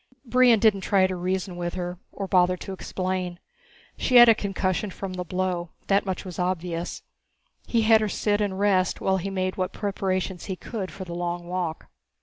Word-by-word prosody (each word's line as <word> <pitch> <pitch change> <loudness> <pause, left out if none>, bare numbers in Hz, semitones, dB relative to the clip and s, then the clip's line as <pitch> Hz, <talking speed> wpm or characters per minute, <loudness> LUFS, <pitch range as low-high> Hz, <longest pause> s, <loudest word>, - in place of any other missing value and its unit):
Brion 250 -1 +5
didn't 210 -3 +3
try 190 0 +3
to 185 0 -1
reason 180 0 -2
with 175 0 -3
her 180 -1 -4
or 195 - -5
bother 180 -1 +3
to 195 - -7
explain. 185 -2 -3 0.6
She 255 - +1
had 240 0 +10
a 230 - +8
concussion 195 -1 -1
from 190 0 -6
the 180 0 -3
blow, 180 -1 -2 0.2
that 200 0 +3
much 190 0 -3
was 180 -2 -7
obvious. 180 -1 -2 0.6
He 230 -2 +2
had 220 0 +6
her 215 - 0
sit 205 +1 0
and 200 -2 -1
rest 195 -2 +2
while 190 0 +1
he 190 +2 -3
made 185 -1 -2
what 185 -1 -2
preparations 190 -3 -2
he 190 - -3
could 195 0 -5
for 190 - -8
the 170 - -7
long 175 0 -3
walk. 175 -3 -3
185 Hz, 190 wpm, -25 LUFS, 180-200 Hz, 0.6 s, had